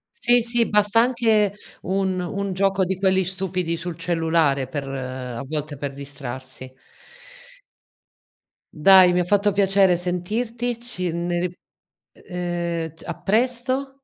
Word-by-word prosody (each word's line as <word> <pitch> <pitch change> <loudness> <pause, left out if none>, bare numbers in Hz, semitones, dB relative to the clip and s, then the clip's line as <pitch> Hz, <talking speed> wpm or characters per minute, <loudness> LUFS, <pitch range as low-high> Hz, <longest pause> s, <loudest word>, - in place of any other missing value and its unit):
Sì, 240 0 +3
sì, 235 0 +1
basta 210 +2 +4
anche 225 -5 +2 0.3
un 190 0 -1
un 195 +2 -3
gioco 195 0 +1
di 190 +1 -1
quelli 190 -1 +3
stupidi 185 -2 -2
sul 170 0 -6
cellulare 165 -5 +1
per 140 0 -5
a 130 -2 -5
volte 150 +1 -4
per 140 0 -5
distrarsi. 130 -2 -8 2.1
Dai, 185 +3 +7
mi 180 - +2
ha 180 - +2
fatto 205 +3 +2
piacere 195 -2 +3
sentirti. 225 +7 -3
Ci 185 -8 -3
ne 175 +1 -2
ri 180 0 -2 0.7
ehm, 175 -3 -3
t - - -13
a 170 - -3
presto. 250 +5 0
180 Hz, 130 wpm, -22 LUFS, 160-205 Hz, 2.1 s, Dai